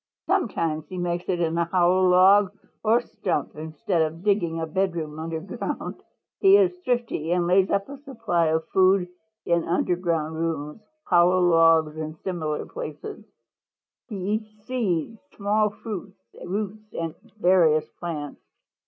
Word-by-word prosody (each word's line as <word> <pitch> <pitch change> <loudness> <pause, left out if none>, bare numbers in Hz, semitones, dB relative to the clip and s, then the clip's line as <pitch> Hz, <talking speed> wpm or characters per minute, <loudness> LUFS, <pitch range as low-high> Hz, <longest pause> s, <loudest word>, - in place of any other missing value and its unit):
Sometimes 165 - 0
he 185 - -7
makes 175 0 -2
it 180 -2 0
in 165 -1 0
a 170 - +2
hollow 185 +1 +3
log 190 +2 +6 0.3
or 225 +2 +4
stump 150 - -3
instead 160 +3 -2
of 160 +2 -2
digging 185 -6 +1
a 165 - -1
bedroom 160 -3 -2
under 160 0 -4
ground. 190 - -5 0.4
He 390 0 +7
is 370 -3 +3
thrifty 240 - -1
and 175 -1 +2
lays 185 +2 +3
up 200 0 0
a 280 +1 -8
supply 230 - -1
of 160 +1 0
food 185 -1 +3 0.4
in 170 -1 +2
underground 170 -2 -1
rooms, 160 +1 -3 0.2
hollow 180 - +4
logs 165 -3 +4
and 155 0 -5
similar 160 -5 -3
places. 460 -3 -7 0.8
He 220 - -7
eats 215 +2 -4
seeds, 225 -5 -2 0.2
small 210 +1 +2
fruits, 200 -2 -7 0.3
roots 210 +2 -4
and 165 -1 -3 0.3
various 170 -5 +4
plants. 155 -4 -5
180 Hz, 140 wpm, -25 LUFS, 165-205 Hz, 0.8 s, He